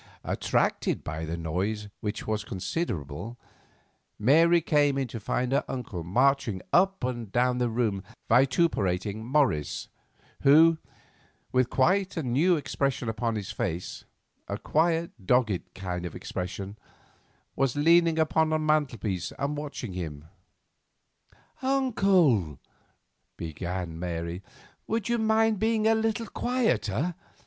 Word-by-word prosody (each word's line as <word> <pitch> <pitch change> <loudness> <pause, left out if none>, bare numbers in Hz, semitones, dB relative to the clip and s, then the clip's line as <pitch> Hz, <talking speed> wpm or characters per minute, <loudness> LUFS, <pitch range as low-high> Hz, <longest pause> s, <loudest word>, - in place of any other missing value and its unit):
Attracted - - 0
by 80 +1 -4
the 80 +2 -4
noise, 95 +6 -2
which 105 +1 -4
was 110 -1 -1
considerable, 100 - -4 0.8
Mary 165 +9 +5
came 145 -3 +2
in 135 -2 -1
to 115 - -6
find 125 +4 -1
her 140 +2 +2
uncle 110 -10 -5
marching 120 +2 +2
up 190 -1 +3
and 120 -5 -3
down 125 +2 +2
the 120 -1 +1
room 110 -4 0 0.3
vituperating 110 - +2
Morris, 120 - 0 0.5
who, 160 +3 +6 0.7
with 130 -1 +2
quite 185 +7 +2
a 160 - -1
new 145 +9 +3
expression 140 -5 -1
upon 115 +1 -1
his 100 -3 -4
face—a 90 -6 -6
quiet, 165 +2 +1
dogged 110 -3 +1
kind 90 -2 -4
of 90 - -6
expression—was 100 +7 -6
leaning 165 +2 +4
upon 160 0 +2
the 155 - +2
mantel 155 -5 +1
piece 95 -4 -3
and 140 +2 -2
watching 145 -8 -5
him. 80 -5 -6 1.4
"Uncle," 195 - +2 0.8
began 85 +1 -5
Mary, 85 0 -4 0.5
"would 225 0 -1
you 235 0 +1
mind 220 -1 +2
being 220 0 +1
a 225 - +5
little 225 0 0
quieter? 180 - 0
125 Hz, 120 wpm, -27 LUFS, -, 1.4 s, who